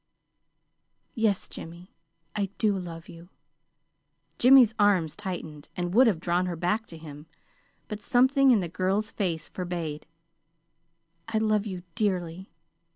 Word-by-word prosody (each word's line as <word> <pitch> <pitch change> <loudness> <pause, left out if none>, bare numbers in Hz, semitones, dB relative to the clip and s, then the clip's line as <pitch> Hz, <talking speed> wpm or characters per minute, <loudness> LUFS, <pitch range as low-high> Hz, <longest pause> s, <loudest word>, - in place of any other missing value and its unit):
"Yes, 220 -4 0
Jimmy, 170 +3 -10 0.4
I 205 -2 0
do 210 -2 +2
love 170 -3 -7
you." 170 +1 -13 1.1
Jimmy's 250 -3 +7
arms 190 -7 +3
tightened, 170 -7 -6
and 175 0 -2
would 250 +4 +6
have 195 -8 +2
drawn 175 +1 0
her 175 - -3
back 180 +7 -1
to 165 - -10
him; 150 -1 -11 0.6
but 210 0 -6
something 265 +2 +4
in 230 -6 +5
the 175 - -3
girl's 190 +5 -1
face 170 -6 -2
forbade. 170 -5 -5 1.2
"I 225 -1 -1
love 215 -1 +1
you 185 -3 -6
dearly. 185 -4 -2
185 Hz, 130 wpm, -27 LUFS, 170-215 Hz, 1.2 s, Jimmy's